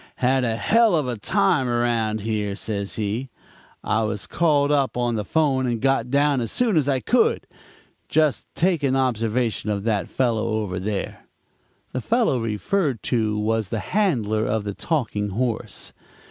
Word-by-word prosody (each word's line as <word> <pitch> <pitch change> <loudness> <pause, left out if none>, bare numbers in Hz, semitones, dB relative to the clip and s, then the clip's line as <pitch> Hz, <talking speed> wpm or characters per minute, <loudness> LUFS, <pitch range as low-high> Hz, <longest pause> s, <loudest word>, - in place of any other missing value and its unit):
"'Had 130 +1 +2
a 115 -2 0
hell 225 - +3
of 150 -5 0
a 125 - -2
time 120 +5 +1
around 115 -3 0
here,' 105 -2 -2
says 100 -1 -3
he. 110 +5 -2 0.5
'I 110 - +1
was 105 -3 -2
called 145 - +2
up 140 -4 +1
on 120 -1 0
the 110 -2 -1
'phone 135 +1 +1
and 120 -2 -1
got 135 -1 +1
down 140 0 +2
as 115 - -3
soon 235 -5 +2
as 145 -3 +2
I 135 -2 +2
could. - - +2 0.6
Just 155 -2 +1
take 175 -2 +1
an 135 -2 +1
observation 115 -3 0
of 100 -2 -1
that 105 -3 -1
fellow 115 -3 0
over 95 -4 -3
there.' 100 +1 -4 0.6
"The 130 - -3
fellow 230 - +1
referred 120 - -1
to 110 -3 +1
was 110 -1 0
the 115 - -2 0.2
handler 120 - +1
of 110 0 0
the 100 0 -4
Talking 110 - -2
Horse. 115 +3 -3
120 Hz, 165 wpm, -23 LUFS, 110-140 Hz, 0.6 s, hell